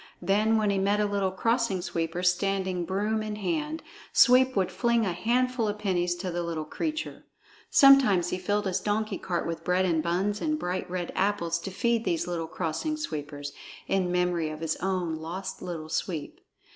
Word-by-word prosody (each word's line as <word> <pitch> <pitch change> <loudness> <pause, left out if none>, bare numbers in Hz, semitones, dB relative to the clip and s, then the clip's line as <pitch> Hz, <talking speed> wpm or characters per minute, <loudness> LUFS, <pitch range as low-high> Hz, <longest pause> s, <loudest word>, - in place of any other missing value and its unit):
Then 215 +3 +3
when 210 -2 +2
he 195 - +1
met 200 +2 +2
a 210 - +3
little 200 -2 0
Crossing 230 +1 0
Sweeper 170 0 -2
standing 185 -1 +1
broom 210 +4 0
in 215 -1 -4
hand, 305 - -2 0.3
Sweep 255 +1 +6
would 185 -2 +1
fling 235 +4 +1
a 185 - -1
handful 245 +4 +1
of 210 0 -2
pennies 180 -4 0
to 180 +1 -4
the 175 +1 -2
little 165 -2 -3
creature. 310 - -4 0.5
Sometimes 255 - +6
he 180 - -2
filled 205 +3 0
his 190 0 0
donkey 215 +2 -1
cart 175 -2 -2
with 165 -1 -4
bread 180 +2 +2
and 165 -3 +2
buns 190 +5 -1
and 305 -1 0
bright 180 -10 -3
red 180 -1 -3
apples 185 -4 0
to 195 - -6
feed 235 +3 0
these 170 -4 0
little 170 -2 -3
Crossing 175 - -2
Sweepers, 145 - -5 0.3
in 185 -2 +1
memory 180 -3 +1
of 155 0 -7
his 160 -1 -1
own 180 -4 -1
lost 170 +5 -6
Little 165 -3 -5
Sweep. 160 -1 -4
190 Hz, 185 wpm, -27 LUFS, 175-215 Hz, 0.5 s, Sweep